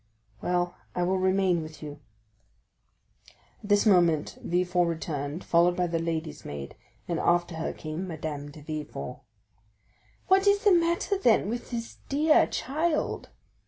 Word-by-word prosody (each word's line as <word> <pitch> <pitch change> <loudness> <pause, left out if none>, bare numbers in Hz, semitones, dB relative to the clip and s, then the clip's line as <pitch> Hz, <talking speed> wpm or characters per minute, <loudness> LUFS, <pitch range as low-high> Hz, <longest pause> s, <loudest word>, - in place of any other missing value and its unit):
"Well, 175 0 0 0.2
I 180 - +1
will 185 +1 +1
remain 185 -2 +2
with 155 0 -9
you." 145 -1 -7 1.6
At 205 - -10
this 205 +1 +4
moment 175 -7 +3
Villefort 180 0 +1
returned, 155 -1 -3
followed 175 +1 +3
by 180 - +2
the 165 -1 -1
lady's 160 -2 -3
maid; 70 -1 -7 0.3
and 170 -2 -1
after 175 0 +2
her 160 - -2
came 155 +4 -5
Madame 150 -3 -5
de 150 +1 -12
Villefort. 155 -1 -6 1.1
"What 385 +1 +4
is 405 +1 +4
the 410 - +6
matter, 345 +3 +2
then, 225 - +3
with 240 +1 -4
this 230 -2 -5
dear 305 +3 +4
child? 305 +5 -1
175 Hz, 140 wpm, -28 LUFS, 160-225 Hz, 1.6 s, the